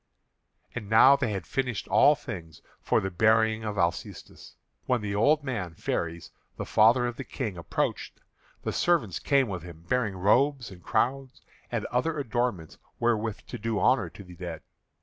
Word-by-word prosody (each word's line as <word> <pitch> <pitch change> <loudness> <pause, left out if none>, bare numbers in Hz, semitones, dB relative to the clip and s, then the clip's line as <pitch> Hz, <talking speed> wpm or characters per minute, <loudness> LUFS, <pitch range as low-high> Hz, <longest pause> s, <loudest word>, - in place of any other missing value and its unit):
And 110 -5 -6
now 120 +5 +7
they 130 -5 -1
had 95 -5 -4
finished 125 -1 -2
all - - +5
things 80 -4 -9 0.2
for - - +2
the 95 - -3
burying 110 +3 +3
of 105 -2 -4
Alcestis, 85 -2 -3 0.3
when 125 -3 +1
the 105 -1 -3
old 145 +9 +3
man 100 -11 -4
Pheres, 85 +1 -3 0.3
the - - -4
father 115 +3 +4
of 120 -1 -4
the 135 - -5
King, 115 -7 -4
approached, 85 - -3 0.5
and - - -1
servants 160 - +1
came 140 -2 +2
with 95 -4 -4
him 85 -1 -12
bearing 120 -5 0
robes 125 +5 +2
and 90 -1 -12
crowns 135 +7 -1 0.3
and - - -2
other 155 +6 0
adornments 120 - -2 0.2
wherewith 115 -2 0
to - - -7
do 110 0 -1
honour 130 +1 +2
to 100 - -12
the 90 -2 -13
dead. 85 -2 -7
110 Hz, 170 wpm, -27 LUFS, 95-125 Hz, 0.5 s, now